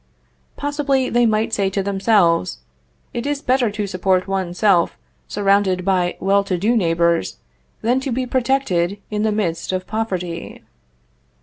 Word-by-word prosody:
Possibly, 285 -2 0
they 240 0 +3
might 220 +1 0
say 195 -1 +1
to 195 0 -2
themselves: 195 - +2 0.6
"It 240 +3 -3
is 290 -1 -1
better 250 -2 +2
to 210 0 -3
support 185 -1 0
one's 190 -2 -2
self 190 -5 +3 0.3
surrounded 195 -2 +1
by 180 -2 +1
well 200 +1 +2
to 185 -2 -1
do 215 +7 +1
neighbors, 170 -4 +1 0.5
than 245 +4 +2
to 265 0 -4
be 255 +2 -1
protected 240 -8 0
in 210 0 -1
the 215 0 +1
midst 175 -6 -2
of 185 0 -2
poverty." 185 -6 -4
200 Hz, 145 wpm, -20 LUFS, 185-235 Hz, 0.6 s, they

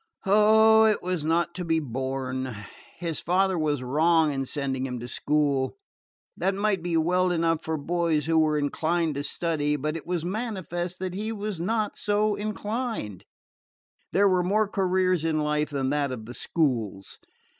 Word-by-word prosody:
Oh, 220 +2 +6
it 215 -1 +2
was 175 -4 -2
not 170 +1 +1
to 180 - -5
be 165 -1 +1
borne! 130 -2 -3 0.4
His 165 -2 -3
father 190 +2 +1
was 150 -5 0
wrong 155 +3 +3
in 135 -1 -2
sending 135 -1 -2
him 125 -1 -5
to 120 - -7
school. 140 -1 0 0.6
That 190 0 0
might 200 -2 0
be 170 -1 0
well 180 +3 +2
enough 165 -1 +1
for 160 0 -2
boys 160 0 0
who 160 0 +3
were 155 -1 +2
inclined 160 +3 0
to 140 - -3
study, 150 0 0
but 150 +2 -2
it 165 - -7
was 175 -2 -2
manifest 185 -4 -3
that 185 -1 -3
he 215 +4 -3
was 210 -5 -4
not 215 +3 -1
so 210 0 +1
inclined. 210 - -4 0.9
There 200 +2 +4
were 185 -2 +3
more 205 +4 +2
careers 185 -3 +1
in 160 -1 0
life 150 0 0
than 135 -2 -1
that 145 -2 0
of 115 -4 -6
the 120 - -8
schools. 120 - -2
165 Hz, 165 wpm, -26 LUFS, 145-190 Hz, 0.9 s, Oh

